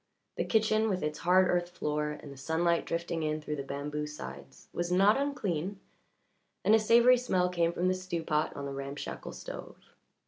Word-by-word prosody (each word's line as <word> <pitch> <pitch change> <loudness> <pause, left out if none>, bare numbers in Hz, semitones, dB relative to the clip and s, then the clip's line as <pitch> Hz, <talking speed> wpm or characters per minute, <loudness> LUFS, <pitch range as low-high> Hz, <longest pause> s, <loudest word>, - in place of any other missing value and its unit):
The - - -1
kitchen, 220 0 +2
with 185 -4 -1
its 150 0 -2
hard 185 +2 +4
earth 175 0 +1
floor 150 -3 -2
and 145 - -10
the - - -13
sunlight 165 +5 +1
drifting 170 0 -2
in 155 0 -1
through 150 0 -4
the - - -2
bamboo 145 +2 -4
sides, 70 - -9
was 175 0 -2
not 195 +4 +5
unclean, 200 - -2 0.9
and 215 - +5
a 220 - +7
savoury 235 +3 +6
smell 185 -7 +1
came 170 -2 +1
from 175 +1 0
the 185 - +3
stew 185 -3 -4
pot 155 -1 0
on 140 - -5
the 140 - -4
ramshackle 140 +1 -6
stove. - - -8
170 Hz, 185 wpm, -30 LUFS, 150-190 Hz, 0.9 s, a